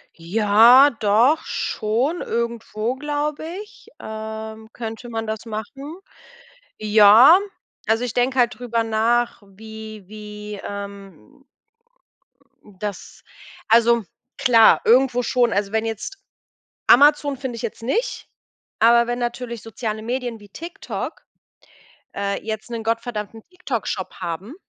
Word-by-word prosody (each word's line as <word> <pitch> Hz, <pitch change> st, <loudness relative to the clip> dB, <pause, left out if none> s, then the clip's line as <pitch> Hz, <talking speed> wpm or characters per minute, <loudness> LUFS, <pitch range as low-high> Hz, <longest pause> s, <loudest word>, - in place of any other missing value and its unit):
Ja, 220 Hz, +9 st, +6 dB
doch 230 Hz, +10 st, +3 dB
schon. 245 Hz, +11 st, -1 dB
Irgendwo, 235 Hz, 0 st, -3 dB
glaube 295 Hz, +2 st, -3 dB, 0.2 s
ich, 460 Hz, +2 st, -19 dB
ähm, 220 Hz, 0 st, -7 dB
könnte 230 Hz, +1 st, -7 dB
man 225 Hz, -1 st, -4 dB
das 220 Hz, +1 st, -5 dB
machen. 270 Hz, -, -7 dB, 0.8 s
Ja, 215 Hz, -, +7 dB, 0.5 s
also, 225 Hz, +2 st, +2 dB
ich 245 Hz, -, -3 dB
denke 255 Hz, +2 st, +1 dB
halt 245 Hz, 0 st, +2 dB
drüber 235 Hz, -2 st, -1 dB
nach, 230 Hz, +1 st, 0 dB
wie 215 Hz, 0 st, -11 dB
wie, 210 Hz, -1 st, -9 dB
ähm 200 Hz, -, -9 dB, 1.2 s
das 205 Hz, -1 st, -8 dB, 0.5 s
also, 235 Hz, 0 st, +4 dB, 0.3 s
klar, 230 Hz, -3 st, +5 dB
irgendwo 250 Hz, +1 st, +4 dB
schon. 240 Hz, -1 st, +1 dB
Also, 200 Hz, 0 st, -1 dB
wenn 220 Hz, +1 st, 0 dB
jetzt 225 Hz, -, -5 dB, 0.7 s
Amazon 290 Hz, +1 st, +5 dB
finde 260 Hz, -2 st, -5 dB
ich 230 Hz, -, -7 dB
jetzt 230 Hz, -1 st, -6 dB
nicht, 430 Hz, -, -2 dB, 0.5 s
aber 235 Hz, +1 st, +5 dB
wenn 240 Hz, 0 st, -2 dB
natürlich 240 Hz, -1 st, -4 dB
soziale 220 Hz, 0 st, -5 dB
Medien 240 Hz, 0 st, -4 dB
wie 205 Hz, -1 st, -16 dB
TikTok, 335 Hz, -, -7 dB, 0.9 s
äh, 200 Hz, 0 st, -2 dB
jetzt 220 Hz, +2 st, -5 dB
'nen 230 Hz, -1 st, -4 dB
gottverdammten 225 Hz, -1 st, -3 dB
TikTok 275 Hz, -, -4 dB
Shop 185 Hz, -, -4 dB
haben 180 Hz, -, -6 dB
225 Hz, 115 wpm, -21 LUFS, 215-250 Hz, 1.2 s, Ja